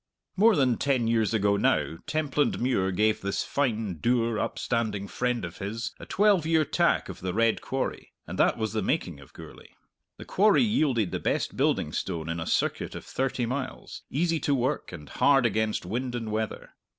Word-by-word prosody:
More 215 +2 +5
than 130 -5 +2
ten 130 -5 +1
years 115 -2 +2
ago 100 -2 +2
now 80 -4 +1
Templandmuir 135 -8 0
gave 110 +3 +1
this 100 0 -1
fine, 110 - -1
dour 115 +1 +1
upstanding 110 -4 -2
friend 125 -1 -1
of 85 0 -9
his 110 +4 -4
a - - -10
twelve 200 -3 +3
year 160 -1 +3
tack - - +1
of - - -8
the 90 0 -4
Red 115 0 +2
Quarry, 135 0 -4
and - - -7
that - - +3
was 110 -2 -2
the 110 - 0
making 90 - -1
of 70 - -15
Gourlay. - - -13 0.4
The - - -10
quarry 210 +4 +4
yielded 140 - +1
the - - -2
best - - -1
building - - +1
stone 85 -3 -3
in 85 0 -2
a 80 - -4
circuit - - -1
of - - -8
thirty 130 -2 -1
miles, 130 +2 -5
easy 165 +3 0
to 145 - +1
work 130 +3 -1
and 75 -5 -9
hard 135 - +3
against 110 -3 0
wind 120 +6 -3
and 115 -3 -4
weather. 110 0 -3
115 Hz, 185 wpm, -27 LUFS, 100-140 Hz, 0.4 s, More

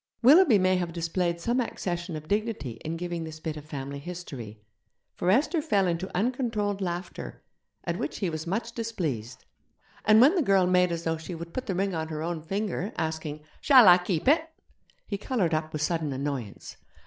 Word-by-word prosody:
Willoughby 285 - +7
may 185 -1 +3
have 175 -2 -3
displayed 170 +1 -1
some 235 +8 0
accession 175 -7 -3
of 155 0 -7
dignity 205 - -2
in 160 +1 -3
giving 175 -1 -4
this 160 -1 -8
bit 155 -1 -4
of 150 -1 -9
family 140 -2 -6
history, 140 -10 -8 0.5
for 175 - -1
Esther 295 - +3
fell 205 -11 +2
into 175 +2 -1
uncontrolled 215 -3 -1
laughter, 175 0 -5 0.4
at - - -3
which - - -3
he 195 - -1
was 160 -1 -4
much 225 +6 -2
displeased. 165 - -4 0.6
And 215 0 +6
when 270 +8 +7
the 365 - +2
girl 195 -8 +4
made 180 0 +3
as 170 0 -3
though 165 -1 0
she 160 +3 -7
would 170 +1 -8
put 255 - -4
the 190 - -1
ring 195 +1 0
on 160 -1 -2
her 155 -1 -4
own 170 -1 -3
finger, 195 +3 -3
asking, 160 -2 -3 0.2
'Shall 260 -7 +8
I 180 0 +9
keep 180 0 -2
it?' 320 +3 +4 0.6
he 200 -2 -4
coloured 200 -8 0
up 155 0 -1
with 155 -1 -2
sudden 160 -2 -1
annoyance. 135 -5 -5
175 Hz, 190 wpm, -27 LUFS, 160-210 Hz, 0.6 s, I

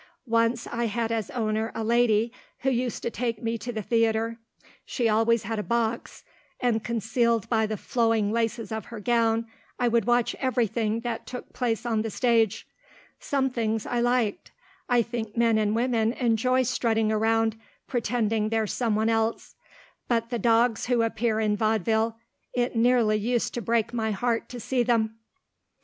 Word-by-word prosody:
Once 230 0 +1
I 235 0 -2
had 225 +1 -2
as 225 -3 -2
owner 220 -1 -1
a 225 - -2
lady 230 -1 +2 0.3
who 270 - +1
used 245 -1 -2
to 235 - -1
take 230 -3 -3
me 230 0 -1
to 245 - -5
the 220 -2 -4
theatre. 230 +1 +1 0.4
She 240 -3 -1
always 225 +1 +2
had 220 +1 -3
a - - 0
box, 235 +1 -2 0.4
and 230 -3 +1
concealed 230 0 0
by 220 -2 +2
the 215 0 -3
flowing 225 -3 +1
laces 230 0 -1
of 220 -1 -4
her 230 -2 -8
gown 230 0 +1 0.3
I 245 - +1
would 235 -3 +2
watch 240 -1 +2
everything 230 -3 0
that 235 -1 -4
took 250 - -8
place 235 -1 -1
on 225 -2 +1
the 225 - -3
stage. 225 -2 +1 0.5
Some 265 -2 0
things 225 -3 -1
I 240 - -1
liked. 240 -3 0 0.4
I 240 -1 +4
think 230 -1 -5
men 230 -2 +3
and 210 0 +1
women 230 -1 +1
enjoy 255 +1 +2
strutting 225 -3 +1
round, 225 +1 +2 0.3
pretending 225 -3 0
they're 225 -1 +1
some 225 +1 -1
one 220 +1 +1
else. 225 0 -1 0.5
But 230 0 0
the 240 - -1
dogs 230 -1 +2
who 240 -2 +2
appear 225 -1 0
in 210 -1 +1
vaudeville 220 +1 +1 0.4
it 245 0 0
nearly 230 -2 +3
used 235 +3 -1
to 240 - -3
break 230 +1 0
my 220 -2 -1
heart 230 +3 -1
to 245 - -7
see 250 +2 0
them. 225 -2 +1
230 Hz, 170 wpm, -26 LUFS, 220-240 Hz, 0.5 s, I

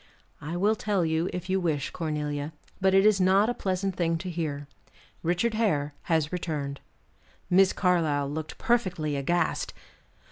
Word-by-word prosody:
"I 165 +4 -4
will 205 +4 +3
tell 205 -5 0
you, 160 +2 0
if 180 0 -5
you 190 0 +1
wish, 155 -6 -1
Cornelia, 150 -2 -3 0.3
but 190 0 +3
it 195 +1 +5
is 210 -3 +5
not 195 +5 +4
a - - -2
pleasant 190 -2 -2
thing 165 -2 +1
to 180 +2 -5
hear. 150 -4 -3 0.5
Richard 175 +7 +1
Hare 155 -10 +1 0.2
has 160 -2 +2
returned." 150 -5 -3 0.7
Miss 190 +1 +6
Carlyle 160 -7 +1
looked 155 +2 -5
perfectly 180 -11 0
aghast. 170 +6 0
175 Hz, 150 wpm, -27 LUFS, 150-190 Hz, 0.7 s, Miss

